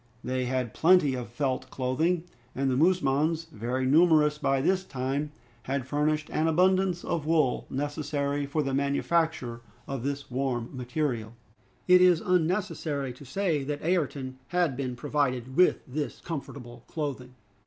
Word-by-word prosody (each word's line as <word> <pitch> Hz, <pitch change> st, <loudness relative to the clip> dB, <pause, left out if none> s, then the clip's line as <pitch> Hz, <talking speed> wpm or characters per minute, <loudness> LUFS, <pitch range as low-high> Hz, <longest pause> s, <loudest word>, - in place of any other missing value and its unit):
They 130 Hz, 0 st, -1 dB
had 125 Hz, -2 st, -2 dB
plenty 165 Hz, -5 st, +4 dB
of 125 Hz, -2 st, -5 dB
felt 130 Hz, +1 st, -2 dB
clothing, 160 Hz, +7 st, 0 dB, 0.3 s
and 135 Hz, 0 st, 0 dB
the -, -, +1 dB
musmons, 160 Hz, 0 st, +2 dB
very 125 Hz, +4 st, -2 dB
numerous 150 Hz, 0 st, +4 dB
by 135 Hz, -2 st, +1 dB
this 185 Hz, +6 st, +1 dB
time, 140 Hz, 0 st, -3 dB, 0.3 s
had 135 Hz, +1 st, -2 dB
furnished 150 Hz, +2 st, 0 dB
an 155 Hz, -, +1 dB
abundance 185 Hz, +2 st, +2 dB
of 155 Hz, -3 st, -2 dB
wool 155 Hz, -5 st, +2 dB
necessary 145 Hz, 0 st, -2 dB
for 150 Hz, +2 st, 0 dB
the 135 Hz, -1 st, -2 dB
manufacture 140 Hz, -2 st, 0 dB, 0.3 s
of 135 Hz, -3 st, -4 dB
this 140 Hz, +1 st, -4 dB
warm 125 Hz, -2 st, -2 dB
material. 125 Hz, -3 st, -2 dB, 0.5 s
It 180 Hz, 0 st, +7 dB
is 180 Hz, -2 st, +6 dB
unnecessary 165 Hz, -6 st, 0 dB
to 135 Hz, +3 st, -13 dB
say 160 Hz, 0 st, 0 dB
that 145 Hz, +1 st, -4 dB
Ayrton 140 Hz, -6 st, -1 dB
had 175 Hz, -6 st, +1 dB
been 130 Hz, -1 st, -3 dB
provided 130 Hz, -2 st, -1 dB
with 180 Hz, +3 st, +4 dB
this 145 Hz, +3 st, -4 dB
comfortable 125 Hz, -6 st, -7 dB
clothing. 135 Hz, -5 st, -5 dB
145 Hz, 145 wpm, -28 LUFS, 130-160 Hz, 0.5 s, It